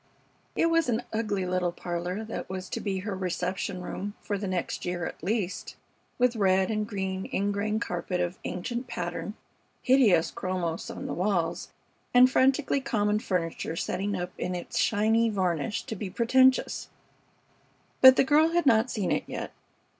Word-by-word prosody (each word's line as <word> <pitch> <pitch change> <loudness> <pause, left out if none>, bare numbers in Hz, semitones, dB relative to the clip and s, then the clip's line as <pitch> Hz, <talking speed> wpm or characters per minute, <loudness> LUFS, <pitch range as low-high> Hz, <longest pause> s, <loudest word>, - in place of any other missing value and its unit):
It 330 - +2
was 330 -5 +2
an 235 +1 0
ugly 210 -4 -1
little 180 -1 0
parlor 175 +4 -4
that 220 - -6
was 185 0 -5
to - - -3
be 195 -2 -2
her 200 0 -4
reception 185 0 -3
room 205 +3 -5
for 205 - -3
the 200 0 -3
next 185 -2 -2
year 175 -1 -2
at - - -7
least, 200 -1 -2 0.4
with 250 -1 +3
red 190 -1 +2
and 215 -1 -1
green 190 -2 -3
ingrain 205 +2 0
carpet 180 -3 -3
of 175 +1 -2
ancient 235 +7 -4
pattern, 190 0 -4 0.5
hideous 230 -11 +4
chromos 175 -3 -3
on - - -6
the - - -3
walls, 180 -3 -1 0.5
and 250 +1 +7
frantically 270 +1 +3
common 210 -5 +1
furniture 165 -5 -2
setting 200 +4 -2
up 180 0 -4
in 180 0 -2
its 175 - -4
shining 225 +2 +3
varnish 180 -1 -1
to 220 - -5
be 195 -1 -5
pretentious; 260 +6 +3 1.1
but 260 0 +10
the - - +4
girl 305 +4 +4
had 345 -1 +2
not 230 -1 +4
seen 205 -7 -1
it - - 0
yet. - - -5
200 Hz, 160 wpm, -28 LUFS, 180-230 Hz, 1.1 s, but